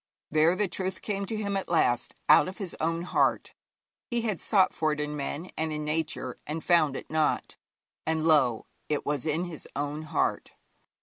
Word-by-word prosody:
There 155 +3 +4
the 210 +1 +1
truth 185 0 -3
came 200 -2 -2
to 220 - -2
him 200 -2 -2
at 195 - -2
last 140 -8 +2
out - - +7
of 185 - -7
his 190 -4 -5
own 165 +1 0
heart. 180 - +1 0.6
He 240 -1 0
had 215 -6 -2
sought 195 -4 +3
for 155 -1 +1
it 150 - -2
in 150 0 -2
men 150 +5 -4
and 160 0 -1
in 150 0 -3
Nature, 150 -4 -2
and 155 +2 -3
found 155 -6 +3
it - - -9
not, 155 -1 0 0.5
and, 160 0 +1
lo! 135 -8 +4 0.2
it 150 -1 -1
was 145 0 -1
in 155 +3 +1
his 175 -4 -7
own 145 +2 -2
heart. 155 - -1
160 Hz, 190 wpm, -28 LUFS, 150-185 Hz, 0.6 s, out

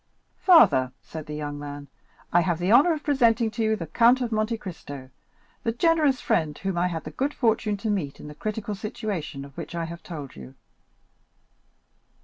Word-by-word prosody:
"Father," 195 - +6
said 160 -1 -8
the 150 - -5
young 145 -1 -4
man, 145 0 -7 0.5
"I 175 - +6
have 175 -1 0
the 180 +4 0
honor 280 +9 +7
of 305 -1 -5
presenting 235 -5 +3
to 225 +1 -2
you 220 0 +2
the 170 - -5
Count 235 - +4
of 245 -2 -2
Monte 215 +1 0
Cristo, 145 -9 -9 0.5
the 230 - 0
generous 300 0 +2
friend 155 -3 0
whom 195 -2 -3
I 175 +1 +2
had 165 -3 -4
the 155 - -7
good 275 - -2
fortune 220 -3 +1
to 220 +2 -3
meet 160 -9 -3
in - - -9
the 150 - -8
critical 215 +5 -4
situation 195 -8 -4
of 140 -1 -15
which - - -7
I 170 -1 -2
have 170 +1 -8
told 150 -6 -8
you." 65 0 -11
190 Hz, 190 wpm, -25 LUFS, 150-230 Hz, 0.5 s, honor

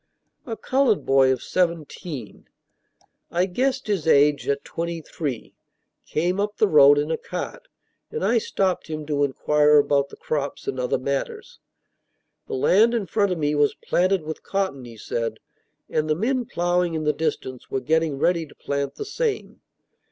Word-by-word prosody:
A 225 -2 -4
colored 260 -5 +1
boy 135 -1 +5
of 130 - -2
seventeen 165 - -3 0.8
I 175 +2 +1
guessed 260 +8 -1
his 195 -7 -1
age 145 -1 +4
at 140 0 0
twenty 170 0 -4
three 145 -6 -5 0.5
came 175 +5 0
up 205 +1 -1
the 215 - +4
road 145 -4 +7
in 150 +2 0
a - - 0
cart, - - -6 0.4
and 460 - -3
I 235 - +3
stopped 190 -3 -1
him 155 -1 -5
to 145 -1 0
inquire 150 +2 +3
about 140 -1 +3
the - - -11
crops 145 -2 -4
and 130 - -2
other 125 - 0
matters. 140 +1 -4 0.9
The - - -3
land 215 - +4
in 220 -4 -1
front 200 +2 +1
of 180 - -1
me 150 -1 0
was 145 -1 +2
planted 185 -1 +1
with 155 +1 -6
cotton, 190 -10 -2
he 115 -2 -11
said; 115 +1 -3 0.5
and 155 0 -1
the 155 - +3
men 245 - 0
ploughing 175 -2 0
in 155 - -2
the 150 0 +2
distance 140 -5 -3
were 135 - -1
getting 160 0 +1
ready 170 +2 +1
to - - -18
plant 140 0 -3
the 425 - -5
same. 440 +1 -3
160 Hz, 170 wpm, -24 LUFS, 140-190 Hz, 0.9 s, road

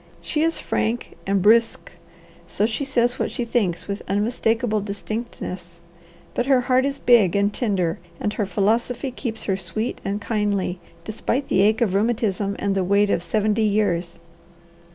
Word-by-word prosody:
She 305 - -2
is 330 +1 +2
frank 230 +2 -2
and 195 -1 +1
brusque, 225 +2 +3 0.6
so 205 - 0
she 230 +5 -2
says 245 -1 +1
what - - 0
she 240 - -3
thinks 210 -7 0
with 200 0 -4
unmistakable 225 +1 0
distinctness, 200 -4 -6 0.5
but 245 - -1
her 265 -2 +4
heart 255 +1 +2
is 275 0 -3
big 225 -9 +4
and 200 +1 +2
tender 190 -9 0 0.2
and 210 - -1
her 210 -2 -1
philosophy 230 +7 0
keeps 235 -3 -5
her 195 - 0
sweet 195 +5 -4
and 200 +1 -2
kindly 205 -4 -1 0.2
despite 235 +7 -2
the - - +3
ache 215 +3 +3
of 210 -6 +2
rheumatism 205 -2 0
and 200 -1 0
the 195 -1 +1
weight 200 +2 +3
of - - +1
seventy 210 +5 0
years." 200 -5 0
210 Hz, 160 wpm, -23 LUFS, 195-235 Hz, 0.6 s, her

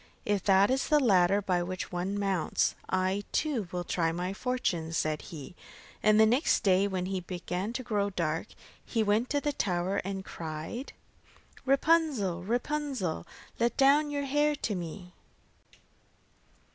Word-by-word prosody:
'If 205 -2 0
that 195 +2 +5
is 265 +1 +1
the 300 -1 +4
ladder 200 -5 +4
by 180 -2 +1
which 185 +1 -4
one 185 +3 -2
mounts, 195 -5 +1 0.2
I 185 +2 0
too 265 - 0
will 180 -1 -2
try 165 -2 0
my 180 +3 -3
fortune,' 190 -9 -2
said 155 -1 0
he, 155 0 -9 0.5
and 215 0 +5
the 220 - +8
next 245 +7 +3
day 195 -1 +4
when 185 -2 -2
it 185 -2 -4
began 180 +3 -3
to 255 +1 -4
grow 205 -4 0
dark, 165 -1 -2 0.4
he 225 -2 0
went 215 +4 +1
to 290 - +1
the 295 0 -1
tower 185 -3 -1
and 195 0 -3
cried: 160 - -6 0.7
'Rapunzel, 275 - +2
Rapunzel, 245 - -2 0.3
Let 235 +1 +1
down 285 +2 +5
your 285 -1 -2
hair 295 +2 +2
to 230 -6 -2
me. 180 0 -6
200 Hz, 150 wpm, -29 LUFS, 180-250 Hz, 0.7 s, the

